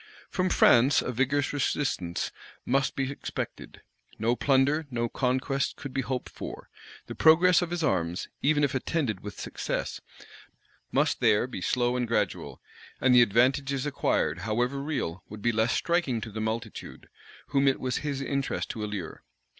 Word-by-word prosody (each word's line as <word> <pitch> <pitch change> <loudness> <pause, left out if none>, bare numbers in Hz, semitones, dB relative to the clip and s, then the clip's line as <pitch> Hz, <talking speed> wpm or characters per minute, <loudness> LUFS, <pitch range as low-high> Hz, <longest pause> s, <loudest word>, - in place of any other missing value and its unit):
From 185 -1 0
France 125 -1 +5
a - - -2
vigorous 135 +3 0
resistance 130 -11 -1 0.3
must 135 +1 +1
be 135 0 -1
expected: 140 - -6 0.3
no 115 +3 +1
plunder, 140 +4 +2
no 120 -2 -1
conquests 130 +3 -1
could 140 -2 -7
be 135 - 0
hoped 130 0 -3
for: - - -9 0.3
the - - -7
progress 170 +3 +5
of 175 - -2
his 175 -1 -2
arms, 90 - 0
even 145 +1 +3
if 140 - +1
attended 130 - -1
with 105 0 -9
success, - - -4 0.9
must - - +1
there 105 - +3
be 125 -7 -7
slow 120 +4 +1
and 125 -1 -1
gradual; 105 -4 -1 0.4
and 130 -1 +4
the 125 - +8
advantages 130 +5 +2
acquired, 135 - 0
however 120 +7 -1
real, 140 - -3
would 105 0 -9
be 120 - +3
less 110 +1 +1
striking 170 -9 +1
to 110 - -7
the 110 +1 -4
multitude, 110 0 -5 0.4
whom 140 -1 +2
it 135 - +3
was 130 -1 -1
his 140 -2 -3
interest 140 0 -2
to 110 - -5
allure. 105 -6 -5
130 Hz, 160 wpm, -28 LUFS, 115-140 Hz, 0.9 s, the